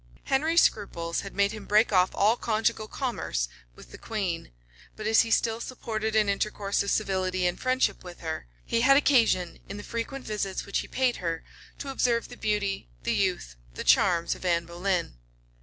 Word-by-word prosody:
Henry's 315 +5 +3
scruples 170 -5 0
had 195 - -9
made 200 0 +3
him 215 -2 -8
break 215 +1 +3
off 185 0 +5
all 210 +3 +4
conjugal 220 -2 0
commerce 210 - -2 0.3
with - - -15
the - - -11
queen; 195 -7 -3 0.5
but 215 - -7
as 220 +1 +5
he 230 - -2
still 225 0 +1
supported 220 -3 -3
an 215 -1 +4
intercourse 200 0 0
of 200 - -2
civility 185 -3 0
and 175 0 0
friendship 255 0 +1
with 180 -1 -10
her, 160 - -4 0.2
he 230 - +1
had 275 +3 +6
occasion, 230 -11 +3
in 200 - -5
the 205 - -7
frequent 245 +4 -5
visits 200 -3 -3
which 200 - -1
he - - -5
paid 255 -2 +1
her, 165 -2 -3 0.3
to 280 - -6
observe 235 -3 +1
the - - -9
beauty, 205 - -1
the - - 0
youth, - - -1 0.2
the - - -4
charms 170 - +4
of - - -11
Anne 170 -2 +1
Boleyn. 175 - -2
205 Hz, 185 wpm, -27 LUFS, 180-230 Hz, 0.5 s, had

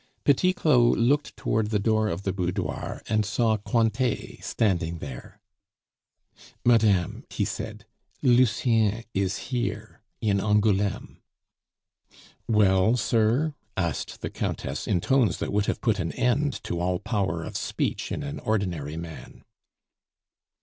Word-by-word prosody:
Petit 150 +6 +4
Claud 125 -9 +4
looked 140 +6 +1
toward 110 -1 0
the 110 - +1
door 110 +1 +2
of 95 +1 -4
the 95 - -1
boudoir, 90 -2 -3
and 110 -1 +2
saw 110 +1 +1
Cointet 115 +2 -1
standing 85 -6 0
there. 65 -5 -9 1.3
"Madame," 105 -7 +3
he - - -1
said, - - -6 0.4
"Lucien 115 -3 +3
is 95 -1 0
here, 110 -4 -3 0.2
in 100 -3 +1
Angouleme." 105 -1 +1 1.3
"Well, 105 +1 +4
sir?" 120 +7 +2 0.2
asked 85 -5 -2
the - - -4
Countess, - - -3
in 90 - +1
tones 130 -2 +2
that - - -3
would 105 0 +1
have - - -1
put 110 -4 +1
an 85 -2 -2
end 135 +3 0
to 85 - -3
all 90 +1 0
power 95 -5 -1
of - - -7
speech - - -2
in - - -3
an 145 +1 -5
ordinary 85 -8 -2
man. 80 -6 -9
105 Hz, 130 wpm, -26 LUFS, 95-120 Hz, 1.3 s, Petit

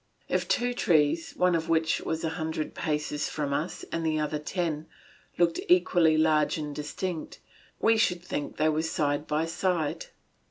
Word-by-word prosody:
If - - 0
two 245 0 +1
trees, 160 -7 +2
one 180 0 +2
of 165 0 -1
which 165 0 +2
was 160 +1 -3
a 160 - 0
hundred 160 -1 -3
paces 150 -1 -2
from 145 -2 -2
us 155 +5 -3
and 165 - -2
the 155 -1 +1
other 150 0 -1
ten, 160 -1 -2 0.5
looked 170 -1 +2
equally 175 -3 +4
large 155 -1 +3
and 150 -2 -5
distinct, 160 +3 -4 0.4
we 225 0 +4
should 180 -5 +1
think 150 -5 -4
they 155 +1 +3
were 155 0 +1
side 150 -2 -1
by 155 +2 0
side. 165 -2 -1
160 Hz, 165 wpm, -28 LUFS, 150-170 Hz, 0.5 s, equally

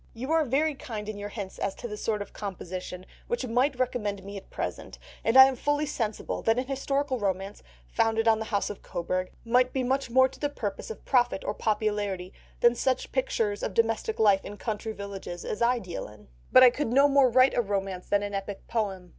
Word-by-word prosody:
"You 260 +6 -4
are 325 -1 +4
very 295 +5 +1
kind 220 -6 -7
in 215 -1 -5
your 205 0 -5
hints 200 -3 -7
as 195 - -2
to - - -6
the 210 - -5
sort 210 -1 -2
of 205 - -18
composition 185 -2 -6 0.2
which 480 - -2
might 250 +3 +1
recommend 210 -6 -2
me 200 +1 -8
at 195 - -9
present, - - -5 0.3
and 225 +3 +3
I 265 - +12
am 265 0 0
fully 290 +4 0
sensible 225 -7 -3
that 225 +1 +2
an 255 - 0
historical 275 0 -1
romance, 195 0 -2 0.2
founded 225 - +1
on 220 -1 +5
the 220 - -3
House 205 -1 -1
of 205 - -10
Cobourg, 185 +2 -3 0.2
might 250 +2 +3
be 265 - 0
much 265 +1 0
more 260 +2 +5
to - - -15
the 290 - 0
purpose 210 - -5
of 450 - -8
profit 245 -6 +2
or - - -1
popularity 205 -4 -1 0.3
than 240 0 +6
such 255 +2 -1
pictures 220 -5 0
of 190 - -3
domestic 225 -1 +1
life 200 -3 +4
in 205 - -8
country 220 0 -3
villages 200 -4 -7
as 210 - -4
I 245 +1 +3
deal 185 -7 -6
in. 105 -7 -16 0.2
But 255 - +8
I 250 - +9
could 290 +2 -2
no 275 +3 +6
more 275 -2 +5
write 255 +2 +5
a 240 - +2
romance 195 -3 -3
than 205 0 +2
an 205 0 -4
epic 195 0 -5
poem. 195 -5 -2
220 Hz, 220 wpm, -27 LUFS, 200-255 Hz, 0.3 s, I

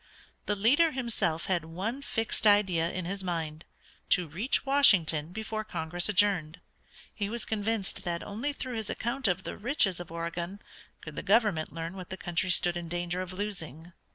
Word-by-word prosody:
The 210 - +1
leader 265 +11 +4
himself 230 -11 -1
had 180 -4 0
one 190 +11 -4
fixed 225 -4 0
idea 190 -5 +4
in 185 -1 -4
his 195 +2 -4
mind, 165 -3 -3 0.4
to 180 -2 +4
reach 195 - 0
Washington 175 - +5
before 220 +2 -4
Congress 175 -1 0
adjourned. 190 -6 +2 0.5
He 205 -2 -3
was 235 +1 -3
convinced 215 -1 -1
that 170 -2 -3
only 230 +8 -3
through 255 -4 -5
his 220 -2 -4
account 240 +2 -1
of 180 - 0
the - - -6
riches 215 - +2
of 175 -2 -8
Oregon 170 +3 -4 0.4
could - - -9
the - - -3
government 205 -11 +2
learn 165 +3 -5
what 185 -2 -8
the 190 - -5
country 175 +1 -1
stood 175 0 +3
in 170 -1 -6
danger 175 +1 -2
of 185 -1 -6
losing. 175 -5 -6
185 Hz, 175 wpm, -29 LUFS, 170-220 Hz, 0.5 s, Washington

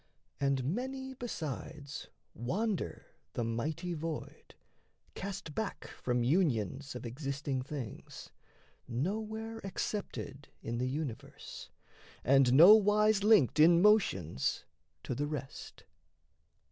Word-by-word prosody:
And 140 -2 +1
many 265 - -3
besides 155 - -6 0.3
wander 190 - -2 0.3
the 120 - -1
mighty 155 +10 -2
void 160 -1 -6 0.6
Cast 190 -5 -6
back 220 +3 -3 0.2
from 120 -1 +1
unions 135 - +1
of 125 - -6
existing 135 +2 -3
things, 130 -4 -7 0.6
Nowhere 220 - -3
accepted 190 -7 -4 0.2
in 115 +1 -3
the 125 +1 0
universe, 140 -4 -6 0.5
And 135 -1 +5
nowise 210 +5 +7
linked 205 - +5
in 170 +2 +7
motions 170 - +2 0.4
to - - -3
the 145 +4 -1
rest. 140 -3 -7
150 Hz, 95 wpm, -32 LUFS, 130-205 Hz, 0.6 s, nowise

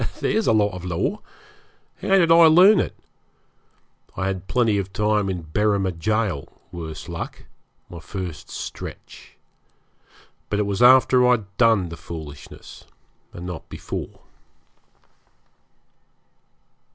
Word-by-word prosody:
There's 220 0 0
a - - +5
lot 105 -2 +2
of 90 -1 -8
law! 90 -2 -2 0.8
How 195 - +3
did 170 -3 +3
I 165 0 +8
learn 185 +6 +7
it? - - -2 1.2
I 95 - -1
had 95 -1 -3
plenty 115 -5 +1
of 95 -1 -5
time 105 -1 0
in 90 -3 -4
Berrima 100 -3 +1
Gaol 95 -2 -2
worse 80 -3 -7
luck - - -7 0.4
my 85 - -10
first 90 -1 -7
stretch. - - -9 1.1
But 105 - -1
it 105 - 0
was 100 +1 -2
after 125 0 +6
I'd 110 -5 0
done 110 -7 +3
the 85 - -8
foolishness, 75 -4 -10 0.5
and 85 - -9
not 90 -4 -7
before. - - -7
100 Hz, 120 wpm, -22 LUFS, 90-115 Hz, 1.2 s, I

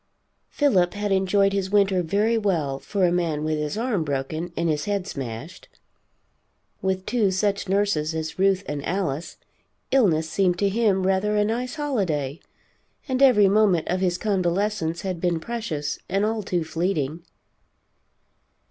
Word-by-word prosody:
Philip 190 -12 +2
had 205 0 -2
enjoyed 195 +1 +2
his 195 -1 -1
winter 195 -2 +3
very 205 +7 +1
well, 165 -11 0
for 195 +3 0
a 175 - +2
man 165 -4 0
with 155 0 -1
his 150 +6 -3
arm 225 -7 0
broken 155 +4 -3
and 170 - 0
his 150 -2 0
head 200 -2 -1
smashed. 135 - -7 1.1
With 190 0 -1
two 225 -4 +1
such 200 +1 -1
nurses 190 -6 +1
as 160 +2 -4
Ruth 195 0 +3
and 145 -1 -4
Alice, 170 -3 -3 0.5
illness 170 -12 +3
seemed 180 +1 +1
to 200 +2 +2
him 200 -3 +1
rather 195 +2 +1
a 210 - +3
nice 245 +6 -2
holiday, 180 - -1 0.7
and 260 -1 -1
every 245 -7 +6
moment 195 -4 +3
of 180 - 0
his 180 -2 +1
convalescence 185 -3 -1
had 185 -3 -4
been 175 -2 +1
precious 165 -8 -4
and 195 +2 +1
all 220 0 -1
too 180 -4 -1
fleeting. 160 -2 -2
190 Hz, 150 wpm, -24 LUFS, 160-205 Hz, 1.1 s, every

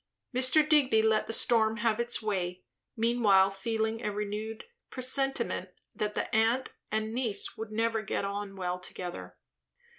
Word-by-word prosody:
Mr. 260 +4 +5
Digby 270 -8 +4
let 220 -1 +2
the - - -3
storm 225 -1 +3
have 230 -1 0
its 235 -1 -1
way, 185 -3 -2 0.3
meanwhile 220 -4 +4
feeling 220 +3 -2
a 210 - -1
renewed 210 +2 -4 0.3
presentiment 255 -6 +1 0.2
that 210 0 -3
the - - -1
aunt 230 +4 +1 0.2
and 220 0 -1
niece 230 -5 0
would 220 -1 -7
never 225 0 0
get 200 - -2
on 200 0 -5
well 180 -1 -3
together. 135 - -8
220 Hz, 145 wpm, -29 LUFS, 200-235 Hz, 0.3 s, Mr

